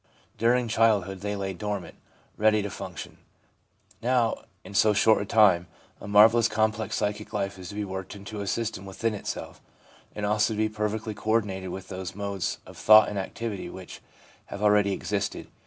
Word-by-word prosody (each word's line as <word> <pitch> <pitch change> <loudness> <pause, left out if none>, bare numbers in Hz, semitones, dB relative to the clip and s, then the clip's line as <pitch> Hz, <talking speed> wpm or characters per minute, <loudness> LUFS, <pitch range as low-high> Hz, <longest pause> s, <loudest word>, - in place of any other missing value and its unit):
During 120 +1 +2
childhood 105 -4 +2
they 105 0 -2
lay 95 -1 -3
dormant, 95 -2 -4 0.4
ready 110 -1 +3
to 105 - -4
function; 95 -4 -8 0.8
now, 120 -1 +1 0.2
in 95 - -11
so 105 +1 +4
short 105 +1 +4
a - - -3
time, 95 -6 +4 0.3
a - - -9
marvellous, 110 +3 +6
complex 110 -1 0
psychic 105 +1 -3
life 100 -2 -2
is 90 -1 -8
to 100 - -8
be 105 0 -2
worked 95 0 -6
into 100 +1 -7
a 100 - -5
system 105 -3 -3
within 110 +4 -2
itself, 105 - -6 0.5
and 105 - -3
also 105 +2 +2
to - - -7
be 110 0 +1
perfectly 110 0 -3
co 105 +1 -7
ordinated 100 -4 0
with 95 +1 -7
those 95 0 -6
modes 100 -2 -3
of - - -13
thought 110 0 +7
and 105 - -3
activity 100 -1 -5
which 95 0 -10 0.5
have 100 - -6
already 105 -1 +4
existed. 100 +1 -3
105 Hz, 175 wpm, -27 LUFS, 95-110 Hz, 0.8 s, thought